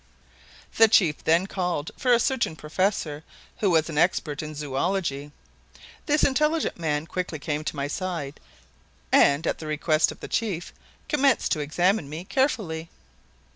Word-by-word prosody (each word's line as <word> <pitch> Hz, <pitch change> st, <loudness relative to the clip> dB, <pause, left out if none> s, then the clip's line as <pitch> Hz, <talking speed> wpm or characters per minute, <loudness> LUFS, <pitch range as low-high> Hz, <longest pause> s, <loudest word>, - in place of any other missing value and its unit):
The 225 Hz, -, +8 dB
chief 180 Hz, -8 st, +3 dB
then 165 Hz, +3 st, +3 dB
called 180 Hz, -6 st, -2 dB
for 250 Hz, -, 0 dB
a 235 Hz, -, +6 dB
certain 240 Hz, -9 st, 0 dB
professor 155 Hz, -1 st, -2 dB, 0.4 s
who 205 Hz, -, +2 dB
was 160 Hz, -3 st, +3 dB
an 155 Hz, -2 st, -2 dB
expert 155 Hz, -4 st, +1 dB
in 155 Hz, 0 st, -7 dB
zoology. 145 Hz, 0 st, -2 dB, 0.8 s
This 300 Hz, 0 st, +2 dB
intelligent 300 Hz, -, +1 dB
man 150 Hz, -2 st, -1 dB
quickly 180 Hz, -1 st, -4 dB
came 150 Hz, +1 st, -3 dB
to 155 Hz, -, -4 dB
my 140 Hz, 0 st, -2 dB
side 160 Hz, -3 st, -4 dB, 0.7 s
and, 140 Hz, +3 st, +4 dB
at -, -, -1 dB
the 155 Hz, -, -7 dB
request 155 Hz, +1 st, +2 dB
of -, -, -12 dB
the -, -, -7 dB
chief, 195 Hz, -7 st, -2 dB, 0.3 s
commenced 280 Hz, -5 st, +2 dB
to 155 Hz, -, +1 dB
examine 165 Hz, +3 st, +1 dB
me 155 Hz, +4 st, -6 dB
carefully. 185 Hz, -, -1 dB
165 Hz, 150 wpm, -25 LUFS, 150-200 Hz, 0.8 s, The